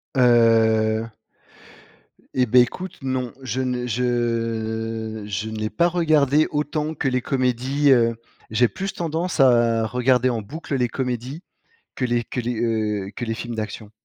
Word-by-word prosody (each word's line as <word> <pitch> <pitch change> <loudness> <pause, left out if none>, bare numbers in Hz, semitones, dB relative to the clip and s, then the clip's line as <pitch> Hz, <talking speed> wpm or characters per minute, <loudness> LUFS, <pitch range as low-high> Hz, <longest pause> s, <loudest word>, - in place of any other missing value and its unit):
Heu. 115 -2 +4 1.2
Et 130 -1 +2
ben, 125 +2 +6
écoute, 180 +10 -3
non. 130 -2 -2
Je 130 0 -2
ne 125 -1 -2
je 115 -2 -2
je 105 +1 -3
n'ai 110 -1 -3
pas 170 +7 +2
regardé 155 -4 +3
autant 150 +1 -2
que 140 - -2
les 130 -1 +1
comédies, 130 +3 +1
heu, 115 -2 +4 0.3
j'ai 120 +3 +3
plus 195 +9 -5
tendance 170 0 -3
à 120 -3 +4
regarder 125 +2 +2
en 115 -3 -2
boucle, 145 +7 -6
les 125 -2 +1
comédies 130 +6 -4 0.5
que 130 - -2
les 120 -1 0
que 125 - -4
les, 120 -1 -3
heu, 105 -4 -1
que - - -3
les 115 -1 -2
films 120 +1 -6
d'action. 110 -1 -6
120 Hz, 150 wpm, -22 LUFS, 115-135 Hz, 1.2 s, ben